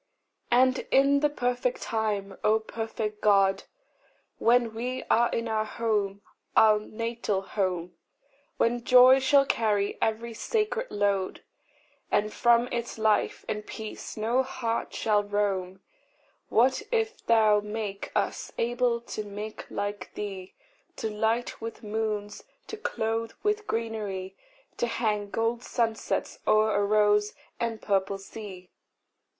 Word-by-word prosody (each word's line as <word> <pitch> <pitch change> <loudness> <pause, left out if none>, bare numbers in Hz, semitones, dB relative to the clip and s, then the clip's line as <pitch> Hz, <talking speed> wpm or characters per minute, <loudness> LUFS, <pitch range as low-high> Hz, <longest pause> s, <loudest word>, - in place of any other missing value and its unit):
And 255 +2 +4
in 275 +1 +4
the 295 +1 +2
perfect 290 - -1
time, 205 -3 -2
O 215 +1 +4
perfect 220 -1 -4
God, 195 -2 +3 0.7
When 235 -1 +3
we 250 +3 -3
are 235 +1 +4
in 230 0 -2
our 220 -1 0
home, 210 -3 -1 0.3
our 215 -1 +6
natal 220 -2 -3
home, 185 -3 -2 0.6
When 240 +1 +1
joy 255 +1 +7
shall 275 +1 +4
carry 210 -5 0
every 230 +1 -1
sacred 445 - -1
load, 200 -2 -1 0.7
And 215 +1 +1
from 235 0 +4
its 235 -1 -3
life 220 -1 +1
and 210 0 -3
peace 220 +1 -7
no 230 +4 +2
heart 235 -3 -3
shall 210 -2 +1
roam, 195 -2 -1 0.7
What 260 - +3
if 450 -1 -1
thou 220 -2 +5
make 210 -1 -5
us - - -1
able 240 0 +1
to 215 -2 -5
make 210 +1 -7
like 205 -2 -4
thee 195 -3 -6 0.4
To 220 - -3
light 225 +3 -1
with 225 +1 -7
moons, 210 -1 -3 0.2
to - - -6
clothe 225 - -2
with 420 0 0
greenery, 205 -4 -3 0.4
To 240 - 0
hang 210 -3 -1
gold 230 +3 -1
sunsets 230 -2 -2
o'er 215 0 +4
a 205 - +2
rose 210 0 +3 0.2
and 230 -2 -2
purple 195 -1 0
sea! 195 -2 -10
220 Hz, 125 wpm, -27 LUFS, 205-235 Hz, 0.7 s, joy